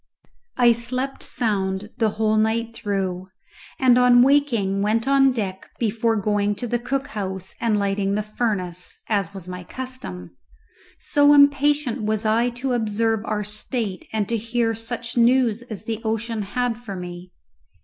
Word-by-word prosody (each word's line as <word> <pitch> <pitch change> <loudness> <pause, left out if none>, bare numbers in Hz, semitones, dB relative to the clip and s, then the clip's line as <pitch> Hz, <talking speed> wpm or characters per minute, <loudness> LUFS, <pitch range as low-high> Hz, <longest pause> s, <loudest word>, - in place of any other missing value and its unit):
I 245 -2 +6
slept 255 +4 -3
sound 200 -2 -2
the 220 -2 +3
whole 215 0 +2
night 225 +1 +1
through, 190 -4 -3 0.5
and 250 -2 +5
on 245 -1 +6
waking 235 -9 +2
went 220 +4 +1
on 275 -1 +5
deck 195 -6 -4
before 225 0 +1
going 205 0 0
to 245 - -4
the 240 0 -1
cook 270 +3 -3
house 190 -2 -5
and 225 -3 +2
lighting 200 0 0
the 210 - -1
furnace 200 -5 -2
(as 200 -5 0
was 190 -3 -9
my 180 0 -6
custom), 175 - -8 0.6
so 290 0 +4
impatient 285 -3 +3
was 215 +1 -1
I 230 +3 +3
to 250 +2 -3
observe 225 -1 0
our 210 -1 -1
state 210 -1 -3
and 215 -2 -1
to 230 - 0
hear 230 +1 0
such 235 +2 -4
news 240 -1 +3
as 220 -4 -8
the 225 0 -4
ocean 225 0 -2
had 235 +3 -2
for 215 -5 -7
me. 180 0 -8
225 Hz, 155 wpm, -23 LUFS, 200-245 Hz, 0.6 s, I